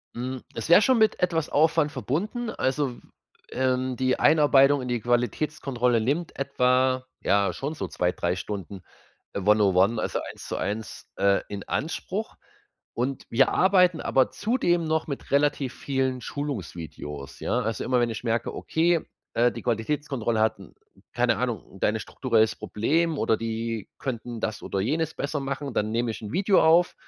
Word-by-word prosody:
Mhm, 130 +1 -4
es - - -4
wäre 170 - +8
schon 255 +4 +4
mit 220 -1 +3
etwas 165 -3 +1
Aufwand 155 0 +3
verbunden. 190 - -2
Also, 130 - -1
w - - -14 0.5
ähm, 130 0 0
die 130 0 +1
Einarbeitung 145 -2 +5
in 125 - -5
die 120 -1 -1
Qualitätskontrolle 125 0 0
nimmt 145 +9 -1
etwa 130 -1 +2 0.2
ja, 100 -2 +2
schon 140 +3 -4
so 95 - -4
2, 90 +3 0
3 90 0 -1
Stunden 95 0 -6 0.5
one-on-one, 100 +1 +3
also - - -1
eins - - -11
zu - - -3
eins, 105 +3 -4
äh, 100 0 +3
in 100 -1 -6
Anspruch. - - -3 0.6
Und, 130 +3 -2
wir 130 +3 +4
arbeiten 180 -3 +4
aber 130 -1 +2
zudem 190 -7 +1
noch 160 0 0
mit 140 -3 -6
relativ 140 -2 +1
vielen 130 -2 -1
Schulungsvideos, 85 - -6
ja? - - 0
Also, 115 +1 -2
immer 125 -1 +2
wenn 120 -1 +1
ich 110 - -5
merke, 115 0 -1
okay, 170 +1 +1 0.3
äh, 120 +1 +4
die - - -8
Qualitätskontrolle 120 -1 -1
hat 110 -2 +2
'n 95 - -14 0.4
keine - - +2
Ahnung - - -4
da - - +3
ein 110 +1 0
strukturelles 110 -1 +1
Problem, 160 +9 0
oder 110 - +2
die 115 -1 -3
könnten 120 -3 -5
das 110 - -3
oder 100 - -3
jenes 155 +9 -1
besser 145 +1 -3
machen, 140 0 -4
dann 105 -1 0
nehme 115 +1 0
ich 110 - -6
'n 105 -1 -7
Video 195 +1 +3
auf 170 +2 +4
130 Hz, 165 wpm, -26 LUFS, 110-150 Hz, 0.6 s, wäre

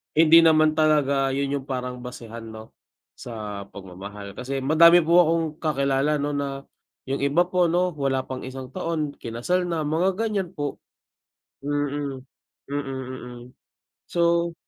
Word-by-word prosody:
hindi 165 +1 +7
naman 155 -1 +5
talaga 140 -3 +2
yun 140 0 -1
yung 135 - -12
parang 125 -1 -4
basehan 115 -2 -9
'no, 110 0 -11 0.5
sa 105 -4 -7
pagmamahal. 100 +1 -9
Kasi 135 +1 -3
madami 170 +4 +6
po 170 +2 +5
akong 165 -1 +3
kakilala 140 -1 +1
'no, 145 0 -1
na 140 -1 -3 0.4
yung 135 +1 -3
iba 140 +5 +3
po 180 0 +1
'no, 180 +2 +1
wala 135 -1 0
pang 130 0 -6
isang 130 -1 -8
taon, 165 -4 -2
kinasal 150 +11 -1
na, 165 -2 -1
mga 165 +6 +1
ganyan 200 -4 -2
po. 145 -1 -4 0.9
Mm. 145 -2 -2 0.5
Mm, 145 0 -1
mm. 130 -2 -7 0.7
So 170 0 +1
140 Hz, 140 wpm, -24 LUFS, 130-165 Hz, 0.9 s, hindi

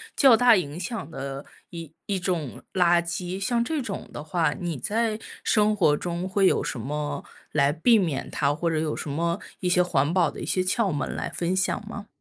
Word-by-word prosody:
较 265 -5 +7
大 240 -1 +6
影 160 -3 -2
响 185 - -4
的 135 -1 -6 0.2
一 165 -3 -8
一 195 -2 0
种 175 -8 -3
垃 175 -2 +4
圾， 175 +2 -4
像 235 +3 +1
这 310 +5 -2
种 210 -6 -6
的 150 - -7
话， 160 0 +1
你 170 -4 -4
在 220 - -1 0.2
生 215 0 +3
活 160 -7 +4
中 175 +3 -3
会 195 0 +3
有 - - +2
什 125 - -4
么 145 +3 -3 0.3
来 140 -1 +3
避 220 +9 +4
免 160 -8 -1
它？ 145 - +1
或 170 +2 -1
者 160 - 0
有 155 -1 -1
什 - - -5
么 170 +4 -1 0.2
一 180 - -1
些 180 0 +4
环 160 -4 +1
保 175 -1 +2
的 - - -9
一 - - -4
些 185 - +1
窍 195 +2 +1
门 145 -2 -3
来 - - -3
分 175 +2 -1
享 190 +2 -1
吗？ 205 -2 -7
175 Hz, 225 characters per minute, -25 LUFS, 155-200 Hz, 0.3 s, 较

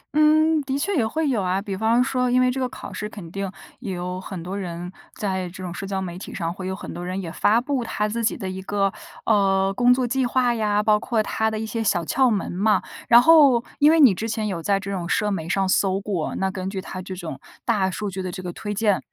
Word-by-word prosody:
嗯， 310 +1 +4
的 270 0 -2
确 375 +7 -1
也 230 -6 +2
会 315 +5 -1
有 240 -7 +1
啊。 185 +1 0
比 200 -1 -4
方 225 +4 +3
说 250 -1 0
因 250 - +3
为 255 0 +3
这 265 - -3
个 255 -1 -1
考 200 - -9
试 210 +3 -4
肯 180 -6 -10
定 195 -1 -4 0.3
也 195 - -5
有 180 +1 -4
很 185 -4 -7
多 185 +3 -5
人 175 -1 -5 0.2
在 190 -3 -2
这 185 +1 -9
种 175 -1 -5
社 195 +2 -6
交 195 -1 -2
媒 180 -1 -5
体 - - -8
上， 170 -2 -2
会 185 0 -6
有 190 - -2
很 - - -8
多 175 - -6
人 185 +2 -3
也 170 -3 -5
发 220 +7 +3
布 260 -1 -1
他 210 -2 -1
自 230 +2 -3
己 220 - +1
的 190 - -5
一 185 0 -5
个， 195 0 0 0.3
呃， 195 -2 +3
工 245 +3 +4
作 250 0 +3
计 260 +2 0
划 245 0 +2
呀， 210 -2 +1
包 210 0 +4
括 225 -3 0
他 220 +1 0
的 220 - -3
一 220 - -3
些 225 +1 -3
小 175 -4 +1
窍 260 +9 +2
门 205 -3 -1
嘛。 200 +2 +2 0.3
然 235 0 +9
后 285 -7 +6 0.2
因 295 - +6
为 325 0 +5
你 260 -9 +8
之 225 +5 -4
前 220 -1 -2
有 175 -4 -3
在 195 +2 +1
这 200 +1 -6
种 175 -3 -3
社 210 0 +1
媒 165 -3 -3
上 195 +1 +1
搜 190 0 +2
过， 195 -6 -3
那 190 0 -1
根 190 0 -4
据 195 -1 -4
它 185 0 -6
这 185 0 -7
种 165 -7 -7 0.3
大 205 -5 +2
数 200 +1 -4
据 190 +1 -4
的 185 -1 -4
这 185 -1 -7
个 175 - -5
推 205 +3 -5
荐， 205 -1 +1
200 Hz, 285 characters per minute, -23 LUFS, 185-235 Hz, 0.3 s, 然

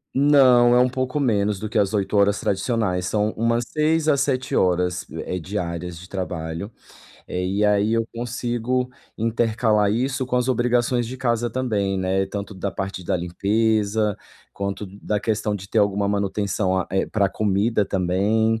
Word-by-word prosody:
Não, 130 -4 +6
é 125 - +5
um 125 0 +4
pouco 130 +2 -2
menos 105 -6 +1
do 110 - -5
que 110 - -2
as 100 -1 +2
8 100 0 -1
horas 100 0 +3
tradicionais. 95 -3 0
São 105 +2 0
umas 115 +1 +1
6 155 +1 +1
a 150 - +5
7 130 -2 0
horas, 90 -1 +1
eh 90 - -4
eh, - - -2
diárias 90 -2 -4
de 90 - -12
trabalho. 90 0 -4 0.6
Eh, 90 0 -3
e 100 +3 0
aí 105 +1 +3
eu 115 0 0
consigo 120 +1 -2 0.3
intercalar 110 -2 +1
isso 130 +4 -1
com 125 - -1
as 125 +1 +1
obrigações 120 0 +1
de 130 +2 -6
casa 120 -2 0
também, 105 -7 -1
né, 95 +1 0
tanto 100 +1 -6
da 95 +1 -3
parte 95 -1 -5
da 90 - 0
limpeza, 105 +3 0 0.4
quanto 100 +1 -4
d 95 +2 -13
da 105 - 0
questão 105 0 -1
de 95 0 -10
ter - - +1
alguma 100 0 +2
manutenção 100 -1 0
a 95 - -2
eh, 95 0 0
pra 100 -2 +1
comida 105 +2 +1
também, 100 +5 +1
105 Hz, 175 wpm, -23 LUFS, 95-120 Hz, 0.6 s, Não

